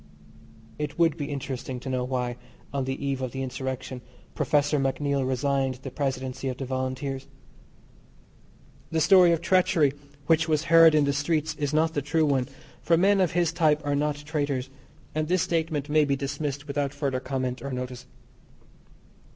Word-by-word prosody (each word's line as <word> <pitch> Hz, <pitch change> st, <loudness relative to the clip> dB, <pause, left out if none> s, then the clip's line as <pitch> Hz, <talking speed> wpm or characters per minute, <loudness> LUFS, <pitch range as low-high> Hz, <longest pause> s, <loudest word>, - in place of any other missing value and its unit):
It 150 Hz, 0 st, -4 dB
would 165 Hz, -3 st, +3 dB
be 150 Hz, -3 st, -4 dB
interesting 130 Hz, -2 st, -4 dB
to -, -, -8 dB
know 130 Hz, -1 st, -1 dB
why, 125 Hz, -1 st, -2 dB, 0.4 s
on 135 Hz, -2 st, -1 dB
the 135 Hz, +1 st, -3 dB
eve 135 Hz, -1 st, -1 dB
of 130 Hz, -2 st, -3 dB
the 135 Hz, 0 st, -3 dB
insurrection, 130 Hz, 0 st, -5 dB, 0.3 s
Professor 145 Hz, 0 st, +1 dB
MacNeill 135 Hz, 0 st, 0 dB
resigned 135 Hz, 0 st, 0 dB
the 130 Hz, +1 st, -8 dB
presidency 130 Hz, -1 st, -3 dB
of 130 Hz, -1 st, -3 dB
the 135 Hz, -, -4 dB
Volunteers. 130 Hz, +1 st, -3 dB, 1.6 s
The 165 Hz, -, 0 dB
story 180 Hz, +2 st, +6 dB
of 165 Hz, -1 st, +1 dB
treachery 175 Hz, -5 st, +3 dB, 0.3 s
which 160 Hz, +1 st, +3 dB
was 155 Hz, -1 st, +1 dB
heard 165 Hz, -1 st, +8 dB
in 150 Hz, -1 st, +4 dB
the 140 Hz, -, +1 dB
streets 155 Hz, +2 st, 0 dB
is 145 Hz, -2 st, -2 dB
not 160 Hz, +1 st, +2 dB
the 145 Hz, -, -1 dB
true 155 Hz, +3 st, +1 dB
one, 135 Hz, -4 st, +1 dB, 0.3 s
for 165 Hz, -, +3 dB
men 195 Hz, +2 st, +4 dB
of 180 Hz, -, +1 dB
his 170 Hz, -1 st, +1 dB
type 155 Hz, -3 st, +2 dB
are 145 Hz, -, 0 dB
not 145 Hz, +1 st, 0 dB
traitors, 145 Hz, -3 st, -3 dB, 0.4 s
and 155 Hz, 0 st, -1 dB
this 180 Hz, +1 st, +2 dB
statement 160 Hz, -4 st, -1 dB
may 155 Hz, 0 st, +4 dB
be 140 Hz, -1 st, +1 dB
dismissed 140 Hz, +1 st, -4 dB
without 140 Hz, -1 st, -2 dB
further 140 Hz, -3 st, -1 dB
comment 130 Hz, -1 st, -3 dB
or 140 Hz, -, -5 dB
notice. 125 Hz, 0 st, -5 dB
140 Hz, 170 wpm, -26 LUFS, 130-155 Hz, 1.6 s, heard